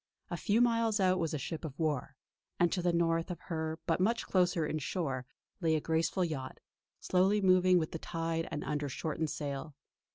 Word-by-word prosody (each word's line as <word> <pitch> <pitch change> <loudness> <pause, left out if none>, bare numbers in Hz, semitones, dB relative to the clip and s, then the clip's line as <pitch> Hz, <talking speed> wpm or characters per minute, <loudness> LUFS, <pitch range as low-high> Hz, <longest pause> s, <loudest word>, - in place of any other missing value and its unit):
A - - -1
few 220 +3 +2
miles 230 -2 +3
out 185 -1 +3
was 165 -2 0
a 155 - -1
ship 150 +4 -5
of 150 -3 -6
war; 150 -4 -1 0.4
and 175 -1 +4
to 180 - 0
the 175 0 +2
north 165 0 +1
of 175 -2 -4
her 160 -2 -3
but 165 0 +1
much 225 +5 +1
closer 180 -3 +2
in 155 +1 -2
shore 135 -5 -2 0.3
lay 165 -3 +2
a - - +2
graceful 165 +4 +1
yacht, 145 -6 -5 0.4
slowly 190 +3 +3
moving 185 -1 +5
with 160 -2 0
the 165 - -5
tide 165 0 -2
and 155 -2 -4
under 145 -1 -2
shortened 155 +2 -2
sail. 145 0 -4
165 Hz, 195 wpm, -32 LUFS, 155-185 Hz, 0.4 s, moving